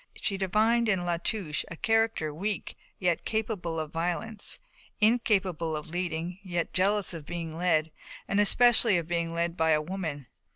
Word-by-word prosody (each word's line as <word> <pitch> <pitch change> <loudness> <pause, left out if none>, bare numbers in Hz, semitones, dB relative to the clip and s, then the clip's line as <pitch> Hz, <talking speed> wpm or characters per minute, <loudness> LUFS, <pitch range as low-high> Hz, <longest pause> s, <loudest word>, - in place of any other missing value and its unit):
She 205 -3 -1
divined 215 +4 +2
in 185 -4 +1
La 175 -1 0
Touche 170 -3 -2
a 165 - -6
character 225 -6 +1
weak 200 +6 -3 0.2
yet 175 -3 0
capable 205 -7 -2
of 155 -1 -4
violence, 180 +6 -1 0.4
incapable 195 -8 +2
of 150 +1 -8
leading 175 0 -3
yet 175 -3 -3
jealous 200 +1 +1
of 165 -3 -7
being 165 -2 -5
led, 160 -2 +1 0.4
and 200 - +1
especially 225 0 +5
of 165 -2 -3
being 170 -1 -1
led 170 0 -1
by 160 -1 +1
a 150 - +3
woman. 155 -5 -4
175 Hz, 160 wpm, -28 LUFS, 165-210 Hz, 0.4 s, especially